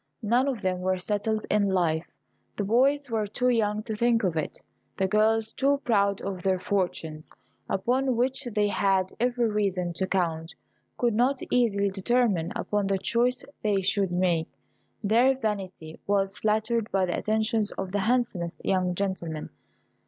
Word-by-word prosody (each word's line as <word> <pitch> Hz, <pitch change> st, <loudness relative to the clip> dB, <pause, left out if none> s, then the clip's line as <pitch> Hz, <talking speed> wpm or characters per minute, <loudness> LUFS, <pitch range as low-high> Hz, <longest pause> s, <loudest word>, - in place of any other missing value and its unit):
None 240 Hz, +5 st, +2 dB
of 245 Hz, -7 st, -2 dB
them 185 Hz, -1 st, 0 dB
were 185 Hz, +1 st, 0 dB
settled 210 Hz, +3 st, -1 dB
in 205 Hz, -1 st, +3 dB
life: 170 Hz, -4 st, +1 dB, 0.5 s
the 205 Hz, -, -2 dB
boys 265 Hz, +6 st, +2 dB
were 215 Hz, -2 st, 0 dB
too 250 Hz, +5 st, 0 dB
young 215 Hz, -3 st, +1 dB
to 220 Hz, -1 st, -4 dB
think 235 Hz, +1 st, +2 dB
of 180 Hz, -4 st, 0 dB
it; 155 Hz, -, -3 dB, 0.4 s
the 190 Hz, -, +1 dB
girls, 220 Hz, +2 st, +2 dB
too 280 Hz, +1 st, +1 dB
proud 200 Hz, -4 st, +2 dB
of 190 Hz, -2 st, -4 dB
their 185 Hz, 0 st, +1 dB
fortunes, 170 Hz, -5 st, -2 dB, 0.4 s
upon 255 Hz, +6 st, +1 dB
which 265 Hz, +3 st, 0 dB
they 210 Hz, -3 st, +1 dB
had 195 Hz, -2 st, +1 dB
every 245 Hz, 0 st, +1 dB
reason 195 Hz, -5 st, -1 dB
to 190 Hz, +2 st, -2 dB
count, 165 Hz, -4 st, -1 dB, 0.4 s
could 240 Hz, -2 st, +1 dB
not 250 Hz, +5 st, +2 dB
easily 200 Hz, -5 st, +2 dB
determine 195 Hz, -4 st, +1 dB
upon 205 Hz, -1 st, -1 dB
the 195 Hz, 0 st, +1 dB
choice 245 Hz, +5 st, 0 dB, 0.2 s
they 200 Hz, -3 st, +1 dB
should 195 Hz, -1 st, +1 dB
make. 175 Hz, -2 st, +1 dB, 0.6 s
Their 240 Hz, +6 st, +4 dB
vanity 190 Hz, -8 st, -4 dB
was 195 Hz, 0 st, 0 dB
flattered 220 Hz, +1 st, 0 dB
by 190 Hz, -1 st, +2 dB
the 175 Hz, -, -2 dB
attentions 220 Hz, 0 st, +1 dB
of 190 Hz, -1 st, -5 dB
the 205 Hz, -, 0 dB
handsomest 215 Hz, -6 st, 0 dB
young 185 Hz, -2 st, +1 dB
gentlemen. 175 Hz, -5 st, -3 dB
205 Hz, 160 wpm, -27 LUFS, 185-230 Hz, 0.6 s, Their